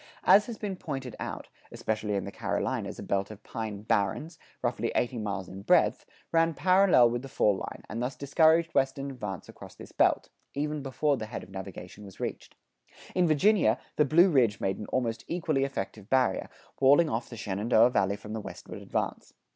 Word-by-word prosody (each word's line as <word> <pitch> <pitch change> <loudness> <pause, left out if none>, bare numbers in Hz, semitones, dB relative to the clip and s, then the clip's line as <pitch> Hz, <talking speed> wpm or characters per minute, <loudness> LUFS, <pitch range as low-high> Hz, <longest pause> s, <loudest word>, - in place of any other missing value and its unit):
As 210 +1 +6
has 235 -3 -6
been 200 -3 -4
pointed 135 -8 -5
out, - - -5 0.2
especially 110 -1 -2
in 100 - -2
the 100 - -6
Carolinas - - -2
a - - -7
belt 100 0 -1
of 105 -1 -11
pine 110 -3 -5
barrens, 110 - -1 0.2
roughly 120 -1 -1
eighty 120 -1 0
miles 100 -3 -3
in 95 +1 -9
breadth, - - +3 0.2
ran 165 -1 +3
parallel 185 -10 +5
with 120 0 -2
the 135 - -9
fall 105 -5 +2
line - - -7
and 115 +3 -4
thus 125 +2 -2
discouraged 160 +4 +3
western 135 +1 0
advance 105 -8 -6
across - - -12
this - - -12
belt, - - +2 0.3
even 150 +1 -2
before 140 +1 0
the 110 - -5
head - - -6
of 95 - -14
navigation 95 0 -8
was 100 -2 -13
reached. - - -5 0.6
In 180 -1 +3
Virginia, 155 - +4 0.2
the 150 - +4
Blue 170 +6 +5
Ridge 120 -8 +3
made 95 - -1
an 105 - -6
almost 120 -3 -1
equally 155 -5 0
effective 105 -5 -5
barrier, 130 -7 +2 0.3
walling 140 +5 +6
off 120 -4 -3
the 115 - -8
Shenandoah 110 +4 +3
Valley 100 -4 +1
from 105 +1 -9
the 110 - -3
westward - - -9
advance. - - -4
120 Hz, 185 wpm, -29 LUFS, 105-150 Hz, 0.6 s, As